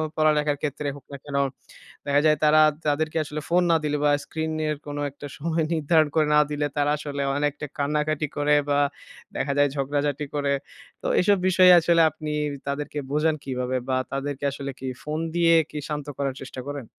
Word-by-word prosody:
পড়ালেখার 150 -1 +2
ক্ষেত্রে 150 0 -3
হোক 140 -2 -14
না 140 - -6
কেন, 145 -1 -6 0.7
দেখা 145 0 +3
যায় 155 -1 +4
তারা, 155 0 +6 0.3
তাদেরকে 155 +2 0
আসলে 150 0 -5
ফোন 175 +1 +4
না - - +5
দিলে 150 0 0
বা 145 - +4
screen 160 - -6 0.3
এর 150 - -1
কোন 145 0 -5
একটা 145 +1 -9
সময় 160 +2 -1
নির্ধারণ 155 0 +3
করে 155 -2 +3
না - - +7
দিলে, 145 0 -1
তারা 145 0 +2
আসলে 145 -1 -5 0.2
অনেকটা 145 0 -1
কান্নাকাটি 150 +1 0
করে 145 0 +3
বা 145 0 +3 0.6
দেখা 140 - -1
যায় 145 0 +4
ঝগড়াঝাটি 145 +1 -1
করে। 140 -1 +1 0.5
তো - - -3
এসব 200 +2 +3
বিষয়ে 185 0 +6
আসলে 170 0 +3
আপনি 155 0 -7 0.4
তাদেরকে 145 +1 -3
বোঝান 155 +2 +2
কিভাবে? 130 -1 -2
বা 130 - +2 0.2
তাদেরকে 140 0 -4
আসলে 140 0 -5
কি 135 - -5 0.2
ফোন 155 +1 -3 0.2
দিয়ে 170 -1 +4 0.2
কি 150 - -8
শান্ত 150 -1 -3
করার 140 -2 -2
চেষ্টা 130 -1 -7
করেন? 145 -3 -5
150 Hz, 185 wpm, -25 LUFS, 140-155 Hz, 0.7 s, না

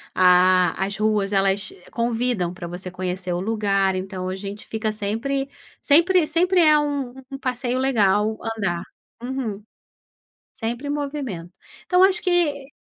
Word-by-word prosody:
a 180 0 +5
a - - +2
as 200 +1 -4
ruas 210 -2 +1
elas 195 +1 +1 0.2
convidam 235 -6 -1
pra 175 -1 -7
você 180 +2 -6
conhecer 185 0 -3
o 175 - -2
lugar, 195 -3 +1
então 185 -1 -4
a 185 - -3
gente 200 +1 -7
fica 220 0 -2
sempre 225 +7 -2 0.4
sempre 340 +3 +4
sempre 355 +3 +2
é 305 -2 +6
um 285 -4 -2 0.2
um 270 - -6
passeio 250 -1 -2
legal, 215 -4 +2 0.2
andar. 175 -5 -1 0.4
Uhum. 240 -5 -4 0.9
Sempre 240 +5 -4
movimento. 275 - -4 0.3
Então 365 0 +4
acho 390 +2 +4
que 315 -7 +1
220 Hz, 140 wpm, -23 LUFS, 190-275 Hz, 0.9 s, é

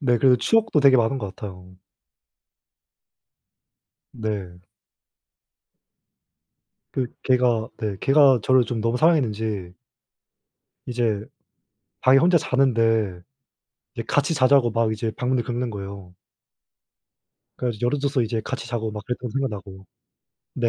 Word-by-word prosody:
네. 120 -4 +2
그리고 125 +2 +5
추억도 220 - +2
되게 135 -2 +6
많은 120 +3 +1
것 100 -5 -6
같아요. 90 -3 -10 2.4
네. 100 -5 -5 2.3
그 130 -2 -1 0.2
개가 125 -3 +1
네. 105 -3 -3
개가 135 -2 +5
저를 130 -1 +4
좀 115 -2 -3
너무 115 +2 0
사랑했는지 110 - 0 1.1
이제 115 -4 -1 0.8
방에 130 +1 +5
혼자 170 +2 +4
자는데 115 - +1 0.7
이제 - - -4
같이 165 - +1
자자고 130 -3 +4
막 115 0 0
이제 110 +1 -3
방문을 125 0 0
긁는 120 +1 -3
거예요. 100 -3 -8 1.4
그래 125 - -2
가지고 115 0 -3
열어 125 +4 +1
줘서 140 -2 0
이제 115 -1 -2
같이 120 -1 -5
자고 115 -3 -3
막 105 -1 -7
그랬던 125 0 -4
거 - - -12
생각나고. 100 -8 -5 0.7
네. 120 -2 0
120 Hz, 245 characters per minute, -23 LUFS, 105-130 Hz, 2.4 s, 되게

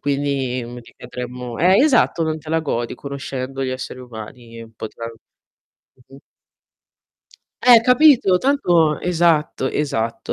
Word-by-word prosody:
quindi, 140 -3 -2
mhmm, 120 +1 -9
ricadremmo 125 0 -8
Eh, 185 +3 +4
esatto, 270 - +2
non 160 -1 -2
te 155 0 -14
la 160 +1 +1
godi 120 -6 -3
conoscendo 135 -1 -6
gli 130 - -2
esseri 130 0 -6
umani 115 -1 -11
un 115 0 -15
po' 110 0 -7
tral 115 +1 -8 1.0
Mh-mh. 135 +1 -15 1.4
Eh, 240 -2 +7
capito? 250 -7 +5
Tanto 175 - +2
Esatto, 165 -6 +1
esatto, 115 -7 -3
140 Hz, 130 wpm, -20 LUFS, 125-170 Hz, 1.4 s, Eh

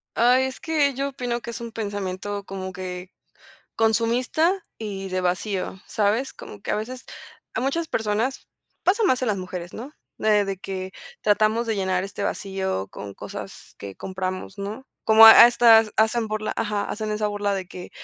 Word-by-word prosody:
Ay, 250 +3 +4
es 265 0 -5
que 300 -4 +1
yo 275 +2 -2
opino 245 -3 -3
que 235 - -8
es 235 - -5
un 235 -1 -7
pensamiento 205 -2 -4
como 190 -1 -6
que 180 0 -7 0.6
consumista 245 - +1
y 195 -3 -5
de 185 0 -1
vacío, 185 +1 -2
¿sabes? 220 +5 0
Como 105 - -11
que - - -8
a - - +2
veces, 245 +4 -5 0.5
a - - +1
muchas 315 +6 -1
personas 225 +2 -1 0.4
pasa 410 +5 +3
más 260 -11 +3
en 245 - 0
las 205 - 0
mujeres, 180 -1 -6
¿no? 260 +7 -8 0.3
Eh 210 -1 +3
de 195 -1 -3
que 190 0 -6 0.3
tratamos 215 +2 +2
de 225 -1 -1
llenar 190 -2 0
este 195 +1 -6
vacío 190 - -2
con 100 -1 -9
cosas - - -9
que 100 -1 -8
compramos, 185 +1 -5
¿no? 210 +7 -6 0.2
Como 220 0 +9
a 225 - +13
a - - +11
estas 230 -2 +6
hacen 220 +1 +2
por 215 0 -3
la 215 - -2
ajá, 210 -1 -1
hacen 215 0 -4
esa 210 0 0
burla 205 -1 -1
de 190 -1 -4
que: 180 -2 -9
210 Hz, 185 wpm, -24 LUFS, 190-235 Hz, 0.6 s, a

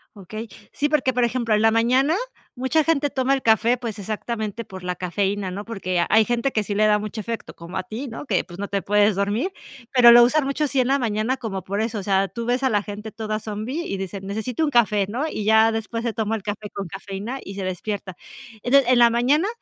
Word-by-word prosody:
Okey. 215 +3 -8 0.2
Sí, 295 - 0
porque, 270 -4 +2
por 245 0 +1
ejemplo, 235 -1 0
en 210 - +3
la 225 - +5
mañana 255 +7 +3 0.4
mucha 260 +5 +1
gente 295 -2 +1
toma 260 0 +1
el 270 - -3
café, 230 +2 +3
pues 230 -4 -5
exactamente 220 +1 -4
por 190 -2 -10
la 180 0 -2
cafeína, 190 +2 -2
¿no?, 200 +3 -5
porque 185 -6 -1
hay 220 0 +5
gente 240 +3 0
que 215 - 0
sí 205 - -3
le 215 +1 +3
da 210 0 +4
mucho 215 +1 -5
efecto, 230 +1 -6
como 170 +1 -8
a - - -2
ti, 220 +9 -6
¿no?, 230 +4 -7
que 200 -9 +1
pues, 175 - -12
no 200 - -3
te 200 0 -1
puedes 205 0 +3
dormir. 205 - 0 0.4
Pero 245 -2 +8
lo 240 0 +9
usan 295 +5 +3
mucho, 275 +2 0
sí 275 -1 0
en 250 - +2
la 275 +1 +3
mañana 225 +2 0
como 195 -7 -5
por 200 +3 -2
eso. 220 -1 -2
O - - -6
sea, 195 0 +2
tú 230 +4 -5
ves 245 +3 0
a 265 - +3
la 205 -1 +2
gente 210 +1 -7
toda 215 -1 -3
zombi, 220 +8 -4
y 195 - -4
dicen: 195 0 -6
"Necesito 220 +8 -2
un 300 - +1
café.", 210 -5 +3
¿no? 250 +9 -2
Y 215 - -4
ya 220 +1 +5
después, 225 +1 -3
se 235 -2 -1
toma 220 0 -1
el 220 - -5
café 210 0 -5
con 200 -2 -5
cafeína 195 +7 -6
y 195 - -8
se 195 - -4
despierta. 185 +1 -4 0.5
Entonces, 260 0 +4
en 250 - +5
la 235 -1 +7
mañana, 270 - +2
220 Hz, 245 wpm, -23 LUFS, 205-245 Hz, 0.5 s, lo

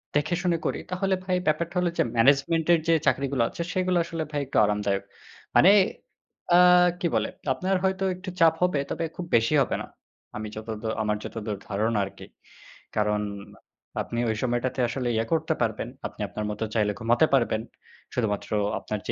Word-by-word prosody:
দেখেশুনে 170 +3 +1
করি - - -1
তাহলে 190 +1 +1
ভাই 185 -1 +1
ব্যাপারটা 170 +3 0
হলো 180 -1 +1
যে - - +6
ম্যানেজমেন্টের 150 +7 +4
যে 165 - +5
চাকরিগুলো 135 -2 +1
আছে - - -6
সেগুলো 185 -1 +1
আসলে 165 -1 -3
ভাই 145 -1 -1
একটু - - -2
আরামদায়ক। 100 -1 0 0.5
মানে 190 - +8 0.8
আ - - +8 0.4
কি 175 - +1
বলে? - - +1 0.2
আপনার 190 +5 -1
হয়তো 190 0 0
একটু 185 +1 -8
চাপ 165 -1 +7
হবে 180 -5 +2
তবে 165 - -1
খুব 180 - -4
বেশি 115 +6 +3
হবে 130 - 0
না। - - -7 0.5
আমি 110 0 -4
যতদ 110 0 -6 0.2
আমার 105 0 0
যতদূর 105 -2 -5
ধারণা 105 +1 0
আরকি। 95 - -11 0.7
কারণ 105 -1 +1 0.8
আপনি 120 - -4
ওই 110 - 0
সময়টাতে 125 +1 -1
আসলে 125 0 -3
ইয়ে 110 +1 +1
করতে 160 0 +1
পারবেন। 115 0 -1 0.2
আপনি - - -12
আপনার 105 +4 -4
মত 105 - -7
চাইলে 105 -2 +2
ঘুমাতে 120 +5 +3
পারবেন। 115 -4 +1 0.5
শুধুমাত্র 105 -4 -1 0.3
আপনার 105 - -4
যে - - 0
130 Hz, 165 wpm, -26 LUFS, 110-170 Hz, 0.8 s, মানে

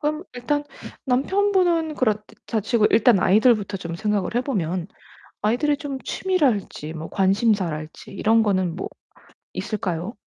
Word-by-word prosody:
그럼 305 +1 -1
일단 290 +4 -1 0.4
남편분은 345 +3 +2
그렇다 215 -2 -2
치고 220 0 +3
일단 230 -2 +5
아이들부터 205 +1 +3
좀 170 -3 -6
생각을 210 0 -1
해 - - +4
보면 180 - -2 0.6
아이들이 280 +7 +1
좀 285 -3 -5
취미랄지 250 - -1
뭐 160 0 -7
관심사랄지 190 -6 0
이런 225 +3 +3
거는 185 -5 0
뭐 190 - -4 0.7
있을까요? 190 -1 -3
215 Hz, 300 characters per minute, -23 LUFS, 190-275 Hz, 0.7 s, 일단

